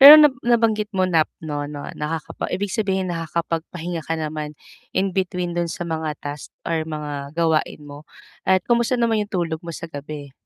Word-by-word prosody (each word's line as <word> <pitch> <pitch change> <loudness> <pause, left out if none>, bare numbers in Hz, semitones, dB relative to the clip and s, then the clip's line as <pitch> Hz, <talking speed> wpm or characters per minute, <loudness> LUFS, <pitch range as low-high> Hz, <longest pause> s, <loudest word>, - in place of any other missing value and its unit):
Pero 285 +3 +14
na 300 -3 +8
nabanggit 225 -3 +3
mo 185 - +4
nap 165 -4 +3 0.2
no 145 -1 -2
no 145 -1 -6
naka 155 +1 -3 0.2
ibig 200 0 -2
sabihin 190 -5 0
nakakapagpahinga 165 +1 -2
ka 165 +1 -2
naman 155 -1 -4 0.4
in 190 0 +2
between 180 -2 -1
dun 175 0 0
sa 175 +1 -4
mga 160 -2 -2
task 145 0 -5 0.2
or 160 -1 -1
mga 145 -1 -5
gawain 160 -2 +2
mo, 145 +1 -11 0.4
at 185 -1 +4
kamusta 240 +1 +3
naman 230 -3 +2
yung 205 - -7
tulog 170 -4 0
mo 170 - -10
sa 170 0 -5
gabi? 145 -1 -6
165 Hz, 180 wpm, -23 LUFS, 155-190 Hz, 0.4 s, Pero